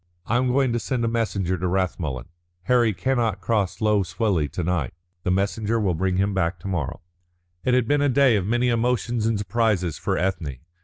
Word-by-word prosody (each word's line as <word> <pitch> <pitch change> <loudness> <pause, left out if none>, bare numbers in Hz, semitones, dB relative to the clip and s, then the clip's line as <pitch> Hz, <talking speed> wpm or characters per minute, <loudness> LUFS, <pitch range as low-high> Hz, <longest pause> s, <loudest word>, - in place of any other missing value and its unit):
"I 115 - +1
am 130 +1 +1
going 130 -1 +2
to 120 - 0
send 120 +3 -1
a - - +1
messenger 100 -6 -1
to 90 - -1
Rathmullen. 85 -9 -1 0.4
Harry 120 +2 +3
cannot 115 -1 0
cross 100 -2 -1
Lough 105 -1 +3
Swilly 95 -5 0
to 90 - -2
night. 80 -4 -1 0.3
The 90 - -2
messenger 100 +4 0
will 100 -4 +1
bring 90 +2 0
him 100 +1 +1
back 95 -2 0
to 100 - -6
morrow." 90 -4 -3 0.6
It 125 - +2
had 125 -3 +2
been 145 +2 +2
a 145 - +3
day 135 -2 +4
of 100 -2 0
many 120 +2 +2
emotions 120 -1 0
and 115 -2 +1
surprises 105 -5 0
for - - -1
Ethne. 85 -8 -2
105 Hz, 200 wpm, -24 LUFS, 90-120 Hz, 0.6 s, day